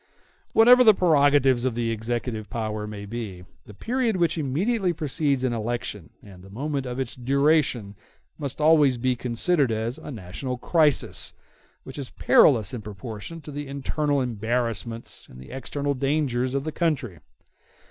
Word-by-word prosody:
Whatever 245 +3 +7
the 215 -4 +7
prerogatives 145 -7 +4
of 130 -3 0
the 115 -1 -1
executive 115 -1 -3
power 110 -2 -3
may 105 -1 -7
be, 100 -5 -6 0.2
the 105 - -12
period 235 - -1
which 170 -2 +1
immediately 175 - 0
precedes 145 -3 -1
an 130 -2 +1
election 110 -6 -4
and 95 -3 -13
the 95 - -14
moment 135 +5 -3
of 125 +1 -4
its 130 - -3
duration 135 -4 +1 0.5
must 140 -2 -5
always 150 -4 +5
be 125 +1 0
considered 130 +4 0
as 115 +5 -2
a - - -9
national 120 +3 -5
crisis, 150 +2 +2 0.5
which 130 +2 -9
is 135 - -5
perilous 115 -7 +4
in 120 - -4
proportion 105 +9 -8
to 150 - -9
the 145 0 -6
internal 140 +1 -1
embarrassments 115 -1 -3
and 65 - -13
the 65 - -12
external 140 +2 -3
dangers 135 -2 0
of 140 - -1
the 155 - -3
country. 145 - -1
130 Hz, 155 wpm, -25 LUFS, 115-150 Hz, 0.5 s, Whatever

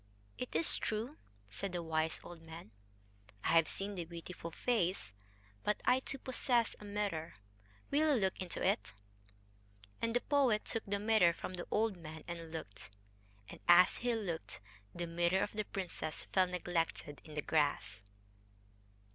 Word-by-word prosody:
"It 250 - -5
is 160 +1 +3
true," 230 +8 -2 0.3
said 180 - -3
the 175 -1 -2
wise 160 0 0
old 175 -2 -10
man. 165 -7 -10 0.7
"I - - +1
have 165 -1 +6
seen 200 +1 -3
the 180 -3 -3
beautiful 170 0 -7
face... 185 - 0 0.5
but 210 - +1
I 250 +1 +5
too 275 - -4
possess 250 -3 +1
a 210 - -10
mirror. 200 - -2 0.6
Will 300 +1 +4
you - - +2
look 190 -2 +1
into 180 -1 -2
it?" 195 - 0 1.1
And 230 0 0
the 245 - +3
poet 265 -7 +3
took 225 - -2
the 200 0 +1
mirror 205 -4 +5
from 185 - -6
the 175 -1 -5
old 215 -2 +1
man 160 -2 -9
and 170 -1 -5
looked; 100 -12 -7 0.6
and, - - -10
as 175 +1 +8
he 240 -1 +1
looked, 175 - -3 0.3
the 175 0 -3
mirror 170 +3 +2
of - - -2
the 215 -1 -2
princess 180 -6 -4
fell 185 -1 +5
neglected 170 -4 -2
in 155 -2 -11
the 150 - -1
grass.... 145 -12 +1
180 Hz, 160 wpm, -35 LUFS, 165-215 Hz, 1.1 s, as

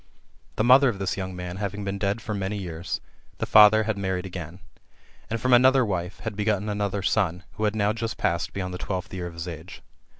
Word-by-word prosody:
The - - +1
mother 130 +3 +7
of 110 - -3
this 95 -1 -2
young 95 -1 -5
man 90 0 -6
having 100 0 -4
been 100 0 -3
dead 100 +3 -1
for 110 - -3
many 100 +1 -2
years, 85 -2 -4 0.4
the - - -2
father 110 0 +7
had 110 -2 -2
married 95 -1 -2
again; 90 -2 -7 0.7
and, 115 +1 -2
from 130 +3 +2
another 130 +1 +6
wife, 90 -3 -3
had 110 -2 -4
b^otten 105 0 0
another 100 -1 -2
son, 90 -4 +1
who 110 - -2
had 105 0 0
now 105 0 +2
just 115 -1 -4
passed 85 0 -1
beyond 90 -2 -4
the 90 - -5
twelfth 90 -1 -4
year 90 -2 -4
of 85 - -10
his 85 +1 -6
age. 85 +2 -9
100 Hz, 220 wpm, -25 LUFS, 90-110 Hz, 0.7 s, mother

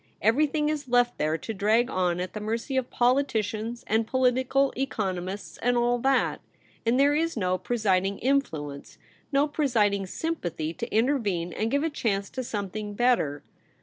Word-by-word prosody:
Everything 300 +7 +2
is 295 -3 -3
left 245 0 +2
there 155 +1 +1
to 225 +8 -5
drag 220 +4 +2
on 180 -6 0
at 180 0 -4
the 215 - -4
mercy 230 +5 -3
of 260 -1 0
politicians 235 -3 0
and 220 +1 +1
political 260 +2 +2
economists 195 -7 -3
and 245 0 +2
all 240 0 +2
that; 265 +1 +1 0.5
and 245 +3 +3
there 285 +1 +5
is 330 -1 0
no 185 -3 +1
pre 245 - -2
siding 195 -2 +1
influence, 165 - -2 0.3
no 280 +1 +3
presiding 215 -10 +1
sympathy, 175 - -3
to 235 +7 -6
intervene 210 - +1
and 220 - -1
give 280 +4 +1
a 325 - +1
chance 200 -8 -1
to 260 - -4
something 205 -1 -4
better. 215 - +1
230 Hz, 160 wpm, -27 LUFS, 195-260 Hz, 0.5 s, there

